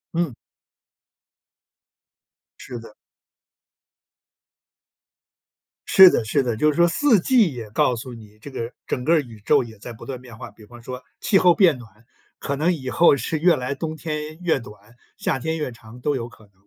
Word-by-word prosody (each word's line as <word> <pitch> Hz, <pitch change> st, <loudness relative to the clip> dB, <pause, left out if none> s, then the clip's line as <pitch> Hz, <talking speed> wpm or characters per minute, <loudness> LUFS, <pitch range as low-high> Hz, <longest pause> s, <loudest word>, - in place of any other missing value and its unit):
嗯。 165 Hz, -7 st, -1 dB, 2.2 s
是 120 Hz, -, -8 dB
的。 115 Hz, -2 st, -13 dB, 2.9 s
是 190 Hz, -1 st, +9 dB
的 115 Hz, -, 0 dB
是 140 Hz, +6 st, +1 dB
的， 120 Hz, -3 st, -2 dB
就 150 Hz, +6 st, +3 dB
是 -, -, -7 dB
说 170 Hz, +2 st, +4 dB
四 230 Hz, -, +3 dB
季 215 Hz, -, +3 dB
也 115 Hz, -4 st, -8 dB
告 120 Hz, +3 st, +1 dB
诉 125 Hz, +2 st, -8 dB
你， 105 Hz, -2 st, -14 dB
这 145 Hz, -, -10 dB
个 120 Hz, -3 st, -5 dB, 0.2 s
整 125 Hz, -, -2 dB
个 165 Hz, +4 st, +3 dB
宇 115 Hz, -5 st, -13 dB
宙 -, -, +4 dB
也 110 Hz, -2 st, -12 dB
在 120 Hz, +4 st, -9 dB
不 110 Hz, -, -12 dB
断 130 Hz, -2 st, -6 dB
变 120 Hz, -4 st, -13 dB
化， -, -, -9 dB
比 105 Hz, +1 st, -17 dB
方 120 Hz, +2 st, -14 dB
说 125 Hz, +2 st, -8 dB, 0.2 s
气 205 Hz, -, +3 dB
候 180 Hz, -2 st, +5 dB
变 170 Hz, -7 st, +4 dB
暖， 120 Hz, -3 st, -13 dB, 0.5 s
可 140 Hz, -, -3 dB
能 160 Hz, +6 st, +1 dB
以 130 Hz, -6 st, -5 dB
后 170 Hz, +1 st, +5 dB
是 160 Hz, -, -2 dB
越 170 Hz, +3 st, +4 dB
来 130 Hz, +2 st, -3 dB
冬 155 Hz, +2 st, -4 dB
天 155 Hz, 0 st, -5 dB
越 170 Hz, -5 st, +1 dB
短， 105 Hz, -1 st, -15 dB, 0.2 s
夏 -, -, -1 dB
天 160 Hz, +5 st, -3 dB
越 150 Hz, -5 st, -3 dB
长 115 Hz, +1 st, -14 dB
都 145 Hz, +3 st, 0 dB
有 120 Hz, -3 st, -4 dB
可 115 Hz, -2 st, -18 dB
能， 100 Hz, -, -36 dB
130 Hz, 195 characters per minute, -22 LUFS, 115-160 Hz, 2.9 s, 是